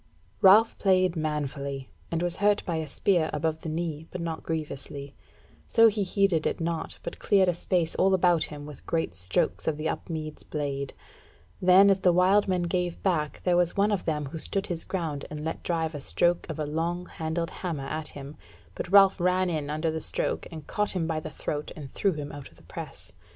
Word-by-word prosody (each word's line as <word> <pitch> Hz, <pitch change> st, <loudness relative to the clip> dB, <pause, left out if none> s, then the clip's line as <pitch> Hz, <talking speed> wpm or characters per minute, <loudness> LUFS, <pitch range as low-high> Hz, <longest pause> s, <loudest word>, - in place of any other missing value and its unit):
Ralph 210 Hz, +4 st, +6 dB
played 185 Hz, -2 st, +3 dB
manfully, 140 Hz, -3 st, -3 dB, 0.2 s
and 165 Hz, +1 st, -1 dB
was 175 Hz, 0 st, 0 dB
hurt 205 Hz, 0 st, +2 dB
by 170 Hz, -2 st, -1 dB
a 160 Hz, -1 st, -3 dB
spear 165 Hz, +2 st, +1 dB
above 160 Hz, -1 st, -1 dB
the 160 Hz, -, -5 dB
knee, 160 Hz, -1 st, -3 dB
but 180 Hz, -, -6 dB
not 165 Hz, -1 st, -3 dB
grievously; 140 Hz, -3 st, -5 dB, 0.5 s
so 230 Hz, -1 st, +6 dB
he 210 Hz, 0 st, -2 dB
heeded 195 Hz, -4 st, +2 dB
it -, -, -2 dB
not, 165 Hz, -1 st, -3 dB
but -, -, -6 dB
cleared 195 Hz, -3 st, +4 dB
a 180 Hz, -, +3 dB
space 170 Hz, -1 st, 0 dB
all 190 Hz, +1 st, +3 dB
about 175 Hz, -3 st, +3 dB
him 145 Hz, -1 st, -8 dB
with 150 Hz, -2 st, -11 dB
great 160 Hz, -, 0 dB
strokes 90 Hz, +1 st, 0 dB
of 155 Hz, -2 st, +1 dB
the 155 Hz, +1 st, -2 dB
Upmeads' 155 Hz, -2 st, -4 dB
blade; 140 Hz, -2 st, -3 dB, 0.7 s
then 185 Hz, +2 st, +7 dB
as 195 Hz, -, +2 dB
the 180 Hz, -, +4 dB
wild 190 Hz, +4 st, +4 dB
men 180 Hz, -2 st, +1 dB
gave 175 Hz, 0 st, -2 dB
back 155 Hz, -6 st, 0 dB
there 180 Hz, -1 st, +3 dB
was 175 Hz, +1 st, +2 dB
one 205 Hz, +2 st, +3 dB
of 200 Hz, -, -1 dB
them 150 Hz, -2 st, -1 dB
who 150 Hz, +4 st, -6 dB
stood 195 Hz, +4 st, -2 dB
his 170 Hz, -2 st, -3 dB
ground 160 Hz, -7 st, -3 dB
and 150 Hz, 0 st, -6 dB
let 160 Hz, -, -3 dB
drive 165 Hz, -2 st, -1 dB
a 145 Hz, -, -5 dB
stroke 175 Hz, +5 st, +1 dB
of 160 Hz, -, -4 dB
a 155 Hz, -, -1 dB
long 165 Hz, +4 st, -2 dB
handled 165 Hz, 0 st, -3 dB
hammer 160 Hz, -7 st, -4 dB
at 155 Hz, +2 st, -4 dB
him, 140 Hz, +1 st, -9 dB, 0.4 s
but 175 Hz, -, -5 dB
Ralph 195 Hz, -1 st, +7 dB
ran 180 Hz, +1 st, +2 dB
in 150 Hz, -3 st, -2 dB
under 155 Hz, +2 st, -1 dB
the 160 Hz, 0 st, -3 dB
stroke -, -, -1 dB
and 155 Hz, -3 st, -8 dB
caught 210 Hz, -2 st, -1 dB
him 170 Hz, -3 st, 0 dB
by 160 Hz, -1 st, -1 dB
the 155 Hz, -, -6 dB
throat 150 Hz, 0 st, -4 dB
and 145 Hz, -4 st, -9 dB
drew 195 Hz, -2 st, +1 dB
him 145 Hz, -2 st, -5 dB
out 145 Hz, -2 st, -9 dB
of -, -, -23 dB
the -, -, -20 dB
press. -, -, -9 dB
165 Hz, 210 wpm, -27 LUFS, 150-180 Hz, 0.7 s, then